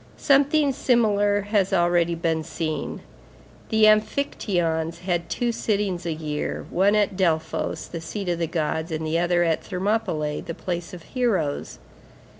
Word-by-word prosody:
Something 285 +1 +3
similar 205 -6 +2
has 205 -1 +1
already 175 -2 +2
been 165 -1 -1
seen. 155 0 -4 0.7
The 220 -1 +2
amphictyons 175 - +1
had 175 -2 -2
two 240 -1 0
sittings 200 -6 -1
a - - 0
year, 155 -1 -3
one 195 +4 +3
at 205 -2 +2
Delphos 165 -4 -1
the 170 - -6
seat 195 +4 -5
of 170 -1 -1
the 165 - 0
gods, 160 0 -2
the 160 0 -1
other 175 0 +2
at 165 -2 +1
Thermopylæ, 185 -6 -1
the 165 - -4
place 175 0 -4
of 170 - -12
heroes. 195 - -1
175 Hz, 140 wpm, -24 LUFS, 165-210 Hz, 0.7 s, Something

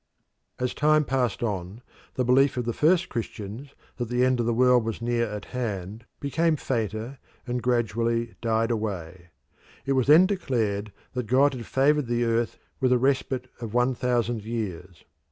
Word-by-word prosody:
As 125 0 -1
time 155 0 +3
passed 125 -4 0
on, 100 +1 -4 0.3
the 125 - 0
belief 130 +2 +4
of 125 - -1
the 120 - -1
first 170 +6 +3
Christians 115 +3 -6 0.2
that 120 -2 -3
the 125 +1 +2
end 130 -1 +2
of 120 - 0
the 120 - +2
world 125 -1 +5
was 115 -1 -3
near 120 0 0
at 105 -1 -6
hand 105 -3 -4
became 160 +3 +1
fainter 115 -1 -3 0.3
and 125 0 -2
gradually 115 -1 0
died 115 0 +1
away. 95 -6 -4 0.6
It 135 - +1
was 130 -2 +1
then 155 +5 +8
declared 115 - -1 0.2
that 125 -3 -3
God 135 +4 +4
had 120 -4 -7
favoured 145 0 +2
the 120 0 0
earth 115 0 0 0.2
with 130 -1 +2
a 125 - +5
respite 130 0 0
of 115 -1 -6
one 125 +1 +3
thousand 120 -3 -1
years. 95 -6 -5
120 Hz, 170 wpm, -26 LUFS, 110-130 Hz, 0.6 s, then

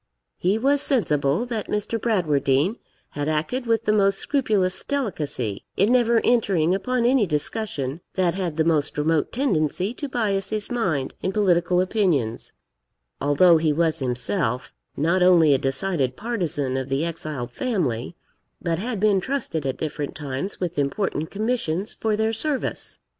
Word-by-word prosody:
He 190 +4 +2
was 275 +4 +2
sensible 155 - +2
that 230 -4 -4
Mr. 210 +2 -2
Bradwardine 155 - +1 0.3
had 145 0 -4
acted 165 +12 -1
with 230 -1 +2
the 210 - +3
most 195 -2 +3
scrupulous 210 -10 0
delicacy, 150 - -3
in 200 +5 +3
never 235 -2 +4
entering 195 -8 +2
upon 235 +5 0
any 245 -4 +3
discussion 150 - -2
that 180 -3 +2
had 180 -5 -3
the 160 - +3
most 155 -3 +1
remote 155 +1 +1
tendency 195 - 0
to 285 +2 -5
bias 200 -6 0
his 215 +1 -2
mind 170 - -1
in 190 - -1
political 180 -3 +2
opinions, 180 - 0 0.7
although 160 +5 +5
he 155 -1 +2
was 160 +1 +1
himself 125 - -2 0.2
not 170 +6 +2
only 170 -5 +6
a 135 - +2
decided 135 -1 -1
partisan 165 - -2
of 130 0 -4
the 135 +4 0
exiled 155 -7 -5
family, 170 - -2 0.4
but 165 -1 -1
had 225 0 -3
been 200 -2 +3
trusted 185 - -2
at 130 - -2
different 150 -2 -4
times 145 +5 -4
with 175 -4 -2
important 155 +2 -1
commissions 210 -4 -1
for 220 -1 -1
their 220 +1 0
service. 275 +4 -3
180 Hz, 150 wpm, -23 LUFS, 150-220 Hz, 0.7 s, only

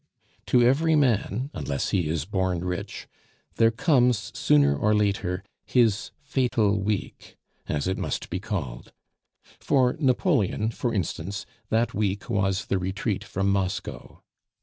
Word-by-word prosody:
To 125 - +4
every 155 +6 +3
man, 125 -1 +1
unless 70 -1 -2
he 90 -5 +1
is 80 -2 -1
born 95 -2 -1
rich, 90 -1 -4 0.5
there 115 0 +5
comes 125 - +2
sooner 70 -1 +4
or 105 +9 +2
later 100 -3 0 0.2
"his 115 -5 +2
fatal 120 -7 +1
week," 105 0 -4 0.3
as 75 +2 -1
it 95 - -1
must - - -3
be 90 - -1
called. 90 - -5 0.7
For 130 -2 +2
Napoleon, 125 - +1
for 120 +1 -2
instance, 100 -1 -3 0.2
that 115 0 +1
week 105 +2 -2
was 95 -1 0
the 95 - 0
Retreat 95 +2 -2
from 100 -1 -1
Moscow. 95 -2 -3
100 Hz, 130 wpm, -26 LUFS, 95-120 Hz, 0.7 s, there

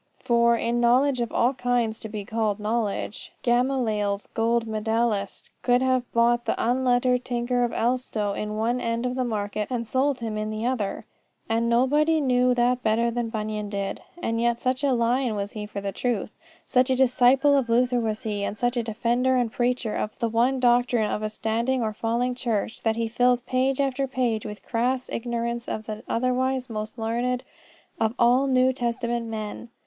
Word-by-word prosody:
For, 235 0 +3
in 235 +1 0
knowledge 255 +2 +3
of 235 - -2
all 245 +3 +2
kinds 245 -3 0
to 220 - -7
be 210 -2 -5
called 220 -1 -1
knowledge, 210 -1 -2
Gamaliel's 240 -5 +1
gold 230 +1 +1
medallist 220 -2 -1
could 245 +1 +3
have 255 -1 0
bought 240 +1 +2
the - - 0
unlettered 250 0 +2
tinker 245 0 0
of 240 - 0
Elstow 230 -4 -1
in 210 +1 -4
one 235 +3 0
end 230 +1 -1
of 250 - -1
the 255 0 -1
market 210 -2 -2
and 235 -3 -3
sold 265 +3 +1
him 220 -2 -3
in 215 0 -2
the 215 +1 -3
other. 240 -6 -2 0.4
And 230 +1 +1
nobody 295 +7 +3
knew 250 -3 +3
that 245 +1 +2
better 230 +1 +1
than 235 -1 -2
Bunyan 215 -2 -3
did. 200 -1 -3 0.2
And 230 -9 -2
yet 235 0 +1
such 255 +2 -1
a 280 - +3
lion 240 0 +1
was 200 0 -3
he 210 -1 -6
for 205 -1 -6
the 200 0 -3
truth, 230 -2 -2 0.3
such 255 0 +2
a 260 - +3
disciple 265 +2 +4
of 265 -4 +1
Luther 245 +1 +3
was 220 -2 -2
he, 205 -2 -2
and 200 - -3
such 245 +2 0
a - - +2
defender 240 +3 +1
and 245 -3 +1
preacher 245 -2 -1
of 215 - -3
the 235 -3 -1
one 245 +4 +2
doctrine 245 -2 +3
of - - -2
a 215 - -2
standing 230 +4 -1
or 215 -1 -1
falling 235 +3 -1
church, 230 -3 -2
that 225 -1 +1
he 230 0 -1
fills 245 +1 +2
page 260 +2 0
after 270 0 0
page 245 -4 -1
with 210 -1 -8
the - - -28
crass 250 +2 -1
ignorance 235 0 -3
of 215 - -4
the 215 -1 -6
otherwise 255 +1 0
most 215 +1 -5
learned 240 +3 -1 0.6
of 225 +1 +1
all 250 +3 +4
the 265 - 0
New 255 0 +4
Testament 235 -1 -2
men. 220 +1 -6
235 Hz, 190 wpm, -25 LUFS, 220-250 Hz, 0.6 s, disciple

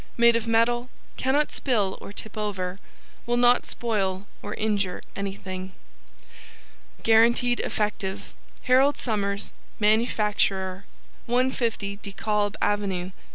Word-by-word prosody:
Made 235 0 +6
of 230 0 -1
metal, 240 +2 +2 0.3
cannot 285 +3 +1
spill 210 -8 0
or - - -8
tip 215 +1 -9
over, 195 -3 -3 0.5
will 240 0 +2
not 245 0 +4
spoil 195 -5 -1 0.2
or 205 +1 -5
injure 205 -4 -1
anything. 190 -1 -5 1.3
GUARANTEED 235 +2 +4
EFFECTIVE 205 -2 -2 0.3
HAROLD 265 +3 +4
SOMERS 200 -3 -2 0.3
Manufacturer 210 -3 +1 0.4
150 235 -5 0
De 200 -1 -8
Kalb 210 -1 0
Ave. 195 -3 0
210 Hz, 105 wpm, -26 LUFS, 200-235 Hz, 1.3 s, Made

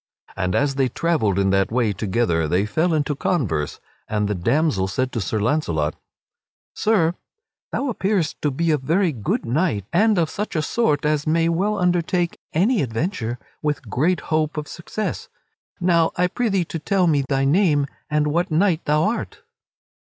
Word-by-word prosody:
And 90 -1 -1
as 140 -1 +2
they 135 -1 +1
travelled 135 - 0
in 95 -1 +2
that 95 +1 +2
way 115 -3 +1
together 95 -5 0
they 90 +6 +1
fell 160 +11 +1
into 150 -2 0
converse, 100 - -1 0.3
and 105 -1 0
the 105 - 0
damsel 100 - +1
said 130 +7 -1
to 115 - -2
Sir 105 +3 -1
Launcelot: 85 - 0 0.8
"Sir, 185 -7 +2 0.6
thou 280 - -1
appearest 200 - -1
to 150 - +1
be 165 +4 0
a 150 - +2
very 165 +7 +1
good 110 -8 -2
knight, 120 - 0
and 210 +3 +4
of 165 -2 +1
such 210 -2 -4
a 155 - +1
sort 150 -6 +1
as 150 -1 0
may 165 +1 +2
well 200 +5 0
undertake 175 -1 0
any 205 +8 +2
adventure 120 - -2 0.2
with 145 -7 -2
great 155 +7 +1
hope 155 0 +1
of 150 -1 -3
success. 215 - -5 0.5
Now 170 -2 +2
I 180 - +2
prithee 195 -2 0
to 165 - -5
tell 190 +3 +1
me 150 -4 +3
thy 135 -1 +1
name 150 -2 +3 0.2
and 150 0 +1
what 165 +4 0
knight 170 +1 +2
thou 150 +1 +2
art." 225 +3 -2
155 Hz, 170 wpm, -22 LUFS, 120-175 Hz, 0.8 s, and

